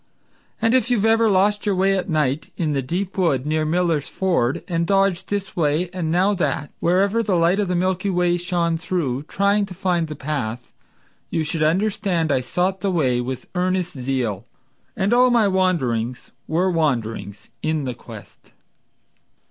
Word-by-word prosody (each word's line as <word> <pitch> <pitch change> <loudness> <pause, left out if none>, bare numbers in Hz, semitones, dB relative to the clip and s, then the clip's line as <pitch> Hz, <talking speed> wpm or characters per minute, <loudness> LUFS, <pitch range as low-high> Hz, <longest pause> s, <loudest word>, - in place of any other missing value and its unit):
And 225 +1 +2
if 255 -1 +2
you 245 - +3
have 210 - +1
ever 225 0 +4
lost 205 +2 +2
your 200 - +2
way 195 +1 +2
at 190 0 -2
night, 150 -2 0
In 155 -4 0
the 135 - 0
deep 180 +8 -3
wood 140 -8 +1
near 155 +1 0
Miller's 165 -2 0
Ford, 170 -10 0
And 170 -2 -1
dodged 195 -1 +1
this 200 -1 -3
way 165 +2 0
and 175 -4 -2
now 185 +5 +3
that, 150 -6 -2
Wherever 195 +6 +2
the 205 -4 0
light 170 +3 +3
of 205 - +1
the 180 - -1
Milky 185 +2 0
Way 175 -1 +2
shone 175 -2 0
through, 160 -7 -2
Trying 200 +1 +1
to 185 - -10
find 175 -3 0
the 155 - -6
path, 125 -5 -4 0.6
You 165 - -1
should 160 +1 -3
understand 180 0 +1
I 130 - +2
sought 180 +9 -1
the 200 - 0
way 130 -9 +1
With 130 +1 -5
earnest 185 0 0
zeal, 125 -6 -2 0.5
and 195 +4 +1
all 250 +1 +5
my 235 -4 +4
wanderings 130 - 0 0.2
Were 180 +4 +1
wanderings 115 - -2
in 155 -1 -1
the 125 -2 -3
quest. 110 -4 -13
175 Hz, 175 wpm, -22 LUFS, 145-190 Hz, 0.6 s, all